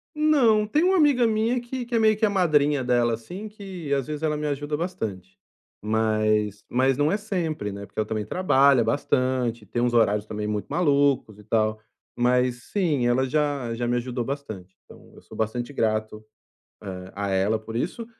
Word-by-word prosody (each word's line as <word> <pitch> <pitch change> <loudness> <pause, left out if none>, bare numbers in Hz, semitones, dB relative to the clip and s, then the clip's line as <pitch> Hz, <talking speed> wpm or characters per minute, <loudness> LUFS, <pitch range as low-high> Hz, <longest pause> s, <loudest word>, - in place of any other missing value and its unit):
Não, 270 -9 +4
tem 295 +10 +1
uma 375 +1 +3
amiga 285 -7 +4
minha 225 +3 +1
que 245 +1 -5
que 240 0 -3
é 230 - +3
meio 215 -1 +4
que 220 - +2
a - - +2
madrinha 150 -7 +2
dela, 120 -1 +2
assim, 175 - -7
que, 190 -8 -6
às 135 -1 -1
vezes, 150 +1 -5
ela 150 -1 0
me 150 - -2
ajuda 145 +1 -2
bastante. 110 - -5 0.4
Mas 110 -1 0
mas 130 +1 +1
não 145 +3 +2
é 205 - +1
sempre, 170 - -3
né, 100 0 -7
porque 100 - -8
ela 110 - 0
também 110 -1 -3
trabalha 135 - +3
bastante, 125 -4 0
tem 120 +4 -3
uns 120 0 +1
horários 105 -3 +3
também 105 0 -4
muito 105 -1 -3
malucos 140 - +1
e 105 - -15
tal. 110 0 0 0.4
Mas 125 0 +1
sim, 155 -11 +1
ela 130 +2 +2
já 140 -5 -1
já 120 +1 -2
me 120 - +1
ajudou 120 0 -3
bastante, 110 -10 -6
então - - -17
eu - - -15
sou - - -13
bastante 120 +4 -2
grato, 110 -3 -2 0.6
eh, 95 -1 -7
a 100 0 -2
ela 95 +3 +1
por 110 +1 -6
isso, 205 - -3
130 Hz, 190 wpm, -25 LUFS, 110-175 Hz, 0.6 s, Não